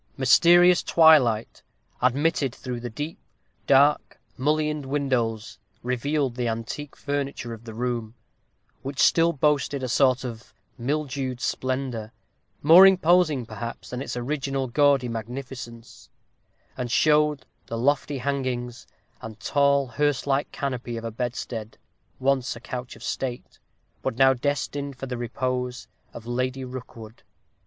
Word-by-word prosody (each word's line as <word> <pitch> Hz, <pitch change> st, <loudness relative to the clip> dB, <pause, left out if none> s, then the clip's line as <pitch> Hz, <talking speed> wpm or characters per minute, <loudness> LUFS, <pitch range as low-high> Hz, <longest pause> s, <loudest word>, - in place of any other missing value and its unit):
Mysterious 175 Hz, +7 st, +6 dB
twilight, 140 Hz, -10 st, +4 dB, 0.4 s
admitted 135 Hz, +1 st, +1 dB
through 125 Hz, -2 st, -5 dB
the 120 Hz, +1 st, -5 dB
deep, 145 Hz, +8 st, -6 dB, 0.5 s
dark, 140 Hz, +2 st, +4 dB, 0.2 s
mullioned 150 Hz, +2 st, 0 dB
windows, 125 Hz, -6 st, -1 dB, 0.2 s
revealed 130 Hz, +2 st, -1 dB
the 120 Hz, 0 st, -2 dB
antique 115 Hz, +6 st, -5 dB
furniture 140 Hz, -4 st, -4 dB
of 115 Hz, 0 st, -11 dB
the 115 Hz, -, -8 dB
room, 120 Hz, -2 st, -3 dB, 0.7 s
which 140 Hz, +1 st, -6 dB
still 165 Hz, 0 st, +4 dB
boasted 145 Hz, -2 st, 0 dB
a -, -, -1 dB
sort 130 Hz, +1 st, +2 dB
of 120 Hz, -2 st, -8 dB, 0.2 s
mildewed 135 Hz, -1 st, -3 dB
splendor, 130 Hz, -5 st, -3 dB, 0.5 s
more 170 Hz, +6 st, +9 dB
imposing, 175 Hz, -7 st, +3 dB
perhaps, 115 Hz, +1 st, -7 dB
than 125 Hz, +1 st, -4 dB
its 135 Hz, -, -5 dB
original 135 Hz, +1 st, -2 dB
gaudy 140 Hz, 0 st, +3 dB
magnificence; 120 Hz, 0 st, -8 dB, 0.7 s
and 125 Hz, -2 st, -4 dB
showed 150 Hz, 0 st, +3 dB, 0.2 s
the 115 Hz, -, -4 dB
lofty 145 Hz, +3 st, 0 dB
hangings, 125 Hz, -3 st, -3 dB, 0.3 s
and 110 Hz, -1 st, -9 dB
tall, 140 Hz, +3 st, +2 dB
hearse 140 Hz, +3 st, 0 dB
like 140 Hz, 0 st, 0 dB
canopy 125 Hz, -4 st, -4 dB
of 115 Hz, -, -6 dB
a 115 Hz, -, -4 dB
bedstead, 115 Hz, -1 st, -5 dB, 0.4 s
once 130 Hz, -2 st, 0 dB
a -, -, -9 dB
couch 125 Hz, 0 st, -7 dB
of 115 Hz, -, -14 dB
state, 125 Hz, -1 st, -5 dB, 0.4 s
but 115 Hz, -, -3 dB
now 135 Hz, 0 st, +6 dB
destined 140 Hz, +1 st, -3 dB
for 135 Hz, -, -6 dB
the 125 Hz, -1 st, -4 dB
repose 125 Hz, 0 st, -3 dB, 0.2 s
of 115 Hz, -, -10 dB
Lady 130 Hz, +2 st, -2 dB
Rookwood. 120 Hz, -3 st, -10 dB
130 Hz, 130 wpm, -25 LUFS, 120-145 Hz, 0.7 s, more